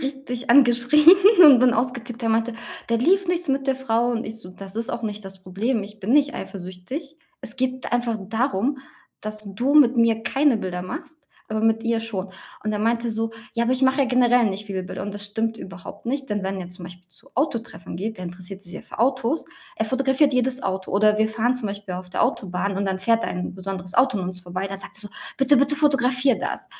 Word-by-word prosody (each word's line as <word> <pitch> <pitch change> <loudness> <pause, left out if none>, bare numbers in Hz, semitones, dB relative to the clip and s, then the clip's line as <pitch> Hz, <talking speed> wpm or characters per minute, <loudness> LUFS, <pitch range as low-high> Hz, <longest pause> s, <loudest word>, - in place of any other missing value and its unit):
richtig 270 -2 -3
angeschrien 255 +3 +5 0.4
und 275 -5 +9
bin 250 0 +4
ausgetickt, 240 0 -3
der 230 - 0
meinte: 225 +1 +1 0.3
„Da 230 - +2
lief 370 +9 +2
nichts 350 -3 -1
mit 270 0 0
der 270 -1 +1
Frau“ 240 -2 0
und 230 0 -2
ich 220 +1 -7
so: 185 -5 -12
„Das 195 +2 -9
ist 230 - -1
auch 235 - -4
nicht 210 -2 -5
das 190 0 -10
Problem. 210 +5 -1
Ich 205 +1 -11
bin 210 +5 -1
nicht 285 0 +3
eifersüchtig. 195 - -7 0.2
Es - - -8
geht 260 -1 -2
einfach 240 -2 0
darum, 250 +3 0 0.4
dass 215 0 -5
du 245 +9 -1
mit 265 -4 +6
mir 230 -1 +3
keine 275 0 +2
Bilder 180 -3 -4
machst, 185 - -7 0.3
aber 215 0 -2
mit 225 0 +2
ihr 230 -1 +1
schon.“ 200 -4 -4 0.3
Und 215 - -1
er 210 - -2
meinte 230 +2 0
so: 225 +1 -2 0.2
„Ja, 235 0 +1
aber 245 - +1
ich 260 +1 +1
mache 265 +1 +3
ja - - +1
generell 245 -1 +4
nicht 200 +2 -6
viele 190 -2 -3
Bilder.“, 180 - -6
und 205 0 -5
das 205 0 -3
stimmt 225 +2 -2
überhaupt 180 +2 -10
nicht, 270 +3 -3
denn 205 -2 -2
wenn 190 0 -3
er 175 - -7
zum 180 0 -9
Beispiel 180 0 -12
zu 175 0 -13
Autotreffen 235 - -3
geht, 215 +2 -4
der 180 - -6
interessiert 185 +2 -7
sich 175 - -6
sehr - - -8
für - - -12
Autos. 260 +4 +1 0.3
Er 220 - -1
fotografiert 265 +3 +2
jedes 255 +1 +1
Auto 190 0 -3
oder 210 +2 +3
wir 220 - +3
fahren 230 +3 0
zum 235 -5 -2
Beispiel 200 -2 -6
auf 180 0 -8
der - - 0
Autobahn 195 -5 -1
und 200 - -1
dann 190 -1 -1
fährt 230 +3 +2
da - - -2
ein 180 0 -4
besonderes 185 -1 -6
Auto 255 -5 +3
an 185 - -3
uns 185 0 -7
vorbei, 185 +2 -4
dann 195 0 -6
sagt 195 - -4
er - - -3
so: 205 - -7 0.3
„Bitte, 275 +1 +5
bitte 280 +2 +2
fotografier 270 -3 +2
das“ - - -4
225 Hz, 230 wpm, -23 LUFS, 195-255 Hz, 0.4 s, und